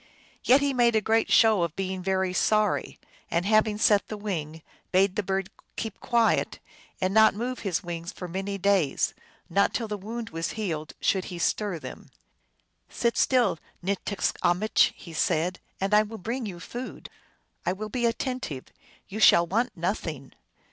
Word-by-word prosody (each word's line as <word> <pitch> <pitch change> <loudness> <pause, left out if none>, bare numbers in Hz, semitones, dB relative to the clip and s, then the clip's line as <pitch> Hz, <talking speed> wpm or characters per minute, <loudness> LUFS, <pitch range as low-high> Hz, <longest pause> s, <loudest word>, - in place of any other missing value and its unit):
Yet 265 +3 +5
he 285 -1 +1
made 235 -3 +4
great 225 +1 +2
show 220 -4 +5
of 170 -2 -1
being 190 -1 -3
very 190 0 0
sorry, 215 +2 +1 0.3
and, 170 +2 0
having 215 0 +3
set 205 -1 +3
the 215 - -5
wing, 160 -6 -4 0.3
bade 190 +1 +3
the - - +1
bird 195 -1 -2 0.2
keep 220 -3 -5
quiet, 235 -1 +1 0.4
and 185 +1 0
not 220 -1 +6
move 245 +3 -3
his 195 -2 -2
wings 170 0 -5
for 180 - -7
many 195 +3 -3
days; 195 -7 +2 0.3
not 200 +4 +2
till 230 - -1
the 210 -1 -4
wound 225 +3 -6
was 165 0 -3
healed 165 -8 -4
should 190 -2 +1
he 180 - -7
stir 195 +2 0
them. 130 -5 -10 0.4
" - - -43 0.3
Sit 235 -1 0
still, 245 - +2 0.3
NticskamichJ 200 0 +1
he 170 - -11
said, 165 +3 0
" - - -42
and 195 +2 -1
I 210 - +7
will 215 +1 -6
bring 230 +4 -4
you 175 -3 -7
food; 245 +9 -7 0.6
I - - +1
will 210 +3 -5
be 240 +2 0
attentive; 230 - -3 0.4
you 210 - -6
shall 170 -5 +7
want 215 +4 -1
nothing." 165 -6 -3
200 Hz, 170 wpm, -27 LUFS, 180-220 Hz, 0.6 s, I